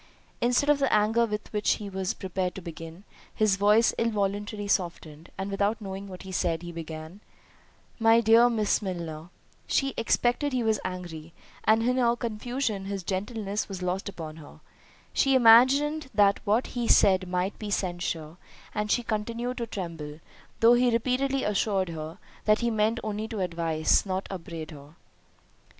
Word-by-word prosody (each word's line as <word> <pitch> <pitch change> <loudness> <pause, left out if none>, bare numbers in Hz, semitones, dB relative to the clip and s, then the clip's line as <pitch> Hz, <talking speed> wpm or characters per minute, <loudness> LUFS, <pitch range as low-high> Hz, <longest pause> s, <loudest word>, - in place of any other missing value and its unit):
Instead 245 +4 +2
of 295 -1 +4
the 275 -2 +1
anger 225 +3 +3
with 210 0 -5
which 210 0 +2
he 210 - -6
was 190 -1 -3
prepared 185 -1 -3
to - - -5
begin, 165 +2 -9 0.3
his 215 -3 +3
voice 210 +3 +4
involuntarily 205 -1 -1
softened, 170 -4 -2
and 195 +1 -4
without 200 +3 0
knowing 195 -1 -6
what 185 -1 -9
he 190 - -8
said, 175 -2 -1
he 175 - -6
began, 160 +2 -8 0.8
"My 225 0 +5
dear 230 +2 +6
Miss 220 -3 +1
Milner."— 170 -4 -5 0.4
She 275 -1 +1
expected 245 +5 +1
he 250 -2 0
was 220 -2 +1
angry, 170 -3 -6 0.3
and 220 +1 +4
in 250 +2 +1
her 240 -2 +3
confusion 235 -2 -3
his 195 -1 -4
gentleness 205 +3 -3
was 185 -2 -6
lost 185 +2 -2
upon 160 -4 -8
her. 150 -2 -13 0.5
She 270 -1 +3
imagined 265 +5 +5
that 200 -1 +4
what 220 +4 +2
he 240 -2 -2
said 190 -3 +4
might 180 +2 -2
be 210 - -5
censure, 175 -4 -3 0.4
and 210 0 -2
she 240 - +2
continued 235 +3 -3
to 235 - -3
tremble, 165 -7 -6 0.4
though 230 +1 +7
he 245 +1 +4
repeatedly 260 +3 0
assured 195 -2 0
her, 160 +1 -6 0.3
that 215 +1 +3
he 235 0 +1
meant 220 +1 +1
only 215 0 -3
to 220 -2 -5
advise, 165 -3 +1
not 190 0 -2
upbraid 165 -4 -7
her. 145 +1 -13
205 Hz, 165 wpm, -27 LUFS, 180-230 Hz, 0.8 s, though